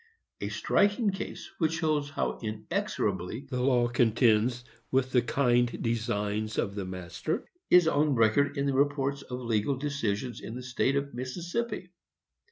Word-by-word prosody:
A - - -3
striking 205 +1 +2
case, 190 - -6
which 160 -2 +2
shows 155 -3 0
how 145 - -2
inexorably 110 -1 -2
the 125 -1 -1
law 125 -2 +3
contends 120 0 +3 0.2
with 130 0 +1
the 125 - +4
kind 120 -1 +2
designs 110 -2 -1
of 100 - 0
the 100 -2 -4
master, 95 - -4 0.2
is 180 -2 +7
on 150 -2 +3
record 125 +6 +3
in 140 - +1
the 140 - +1
reports 140 0 +1
of 125 -2 -6
legal 115 +3 +1
decisions 125 -5 -2
in 110 - -7
the 125 - -6
State 130 +2 0
of 140 0 -1
Mississippi. 175 - -3
125 Hz, 150 wpm, -29 LUFS, 115-145 Hz, 0.2 s, is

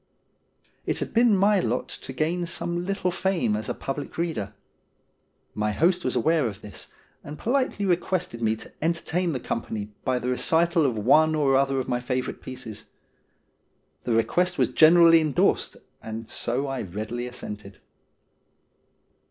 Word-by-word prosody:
It - - -1
had - - -5
been 235 -3 +4
my 200 +1 +4
lot 120 -4 -1
to 135 - -8
gain 170 +5 -1
some 175 +1 -3
little 195 -2 -1
fame 180 - 0
as 110 +1 -3
a - - -2
public 140 +1 -5
reader. 130 - -3 1.0
My 105 0 -1
host 175 - +2
was - - -1
aware 160 -5 +2
of 100 -2 -7
this, 105 - -8 0.4
and 145 +1 -8
politely 255 -4 0
requested 180 -7 -1
me 110 -1 +2
to - - -11
entertain 170 +2 0
the 130 - -2
company 105 -3 -4
by 130 -1 +1
the 125 0 -3
recital 165 +4 +2
of 120 -4 -2
one 155 +9 +4
or 140 -3 +3
other 135 0 +2
of 130 - -2
my 125 - 0
favourite 125 +1 -3
pieces. 120 -5 -7 1.2
The 120 - 0
request 175 +11 +1
was - - +2
generally 165 0 +7
endorsed, 150 -4 +1 0.2
and 110 0 -7
so 125 +5 -1
I 135 -2 -3
readily 110 +6 -5
assented. 105 -5 -8
140 Hz, 150 wpm, -25 LUFS, 115-170 Hz, 1.2 s, generally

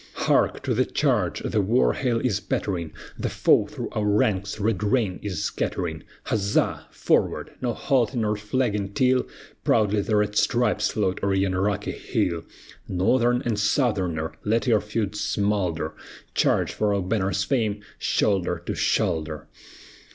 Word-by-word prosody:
Hark! - - +1
to - - 0
the - - +3
charge! - - 0
the 105 - +1
war 115 +6 +3
hail 120 -3 0
is 110 -4 0
pattering, 90 -6 -2 0.3
The - - -1
foe - - +3
through - - -6
our 105 - -2
ranks 100 -1 +1
red 105 -2 0
rain 105 -4 +1
is 95 -6 -3
scattering; 80 -3 -2 0.2
Huzza! 100 -2 0
forward! - - 0
no 125 -2 0
halting 125 -4 +1
or 105 0 +1
flagging 105 -2 -1
till 130 +2 +2 0.4
Proudly 105 -2 +2
the 105 +2 0
red 105 0 +1
stripes 120 -2 +2
float 95 -3 -1
o'er 100 -1 +2
yon 95 -1 +1
rocky 100 +1 0
hill. 85 -2 -2 0.4
Northern 120 +7 +2
and 110 -3 0
Southerner, 95 - 0
let 115 +4 +1
your 110 -5 +3
feuds 105 -1 -3
smolder; 95 -6 0 0.4
Charge! - - +2
for 105 -1 +1
our 100 - 0
banner's 100 0 0
fame, 110 -6 -1 0.2
shoulder 100 -4 +1
to - - -2
shoulder! 75 -2 -1
105 Hz, 145 wpm, -25 LUFS, 95-115 Hz, 0.4 s, the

